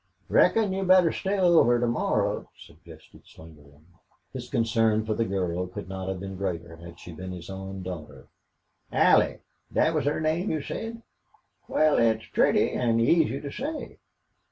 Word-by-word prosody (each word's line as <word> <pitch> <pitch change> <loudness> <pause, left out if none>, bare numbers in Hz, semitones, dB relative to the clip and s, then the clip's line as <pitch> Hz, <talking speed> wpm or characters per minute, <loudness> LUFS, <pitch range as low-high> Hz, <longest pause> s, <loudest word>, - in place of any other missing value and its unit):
"Reckon 215 -4 +3
you'd 190 0 -2
better 185 -3 +6
stay 195 +1 -2
over 170 -10 +4
to 120 - +1
morrow," 120 +1 -1
suggested 80 0 -16
Slingerland. 75 -2 -17 0.5
His - - -7
concern 115 -1 +1
for 110 - -1
the 115 +2 0
girl 90 -2 -2
could 90 -1 -8
not 95 0 -5
have 95 -1 -4
been 95 0 -7
greater 85 -4 -4
had 85 0 -12
she 90 - -10
been 95 +4 -7
his 90 0 -8
own 95 0 -7
daughter. 90 -5 -8 0.7
"Allie - - +3 0.3
thet - - +2
was - - 0
her 145 - 0
name, 160 +5 0
you 155 -3 -2
said. 230 +6 -6 0.6
Wal, 155 -1 +3
it's 110 -1 +2
pretty - - +3
an' 115 -2 +1
easy 140 +3 +2
to 140 - -6
say." 295 - -6
110 Hz, 160 wpm, -26 LUFS, -, 0.7 s, better